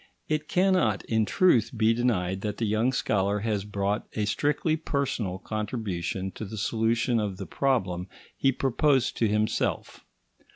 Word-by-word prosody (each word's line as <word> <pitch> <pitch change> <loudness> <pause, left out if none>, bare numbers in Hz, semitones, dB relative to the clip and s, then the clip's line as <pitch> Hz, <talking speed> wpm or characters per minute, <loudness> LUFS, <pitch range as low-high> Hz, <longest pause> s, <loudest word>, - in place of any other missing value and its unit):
It 155 0 -1
cannot, 180 - +2
in 110 -1 +1
truth, 125 - +3
be 110 +1 +4
denied 95 -6 0
that 105 -1 -3
the 115 - -1
young 110 +4 +2
scholar 100 -4 0
has 105 -2 -1
brought 100 0 -2
a 105 - -1
strictly 145 +8 +1
personal 140 - -2
contribution 95 -4 -3
to - - -8
the 110 +2 -7
solution 115 +3 +1
of 100 -3 -2
the 95 - -6
problem 95 -11 0 0.3
he 135 - +2
proposed 135 +1 +1
to 115 - +2
himself. 105 +1 -1
110 Hz, 150 wpm, -27 LUFS, 100-130 Hz, 0.3 s, be